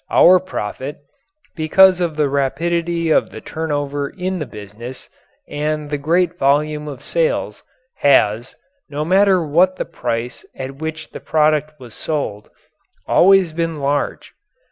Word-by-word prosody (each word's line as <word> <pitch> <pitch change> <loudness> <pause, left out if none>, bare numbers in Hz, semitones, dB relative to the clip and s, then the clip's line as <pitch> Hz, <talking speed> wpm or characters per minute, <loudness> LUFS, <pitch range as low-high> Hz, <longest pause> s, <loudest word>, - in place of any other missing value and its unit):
Our 185 +1 +6
profit, 145 - -5 0.6
because 185 +3 +5
of 170 -3 -1
the 150 -1 +1
rapidity 165 +4 -1
of - - +3
the - - -9
turnover 145 -3 -3
in 185 0 -4
the 150 - -4
business 110 +3 -10 0.4
and 150 0 -3
the 145 - 0
great 175 +4 +1
volume 150 +2 +1
of 140 -2 -8
sales, - - -1 0.4
has, 120 -3 +2 0.3
no 150 +1 -3
matter 190 0 +3
what 175 +5 +3
the - - -4
price 120 +1 -4
at 135 +1 -7
which 160 +1 -6
the - - -8
product 155 -1 +1
was 120 -3 -12
sold, 125 -10 -4 0.6
always 190 -3 +4
been 165 -1 -2
large. 140 +1 -2
150 Hz, 135 wpm, -19 LUFS, 140-170 Hz, 0.6 s, Our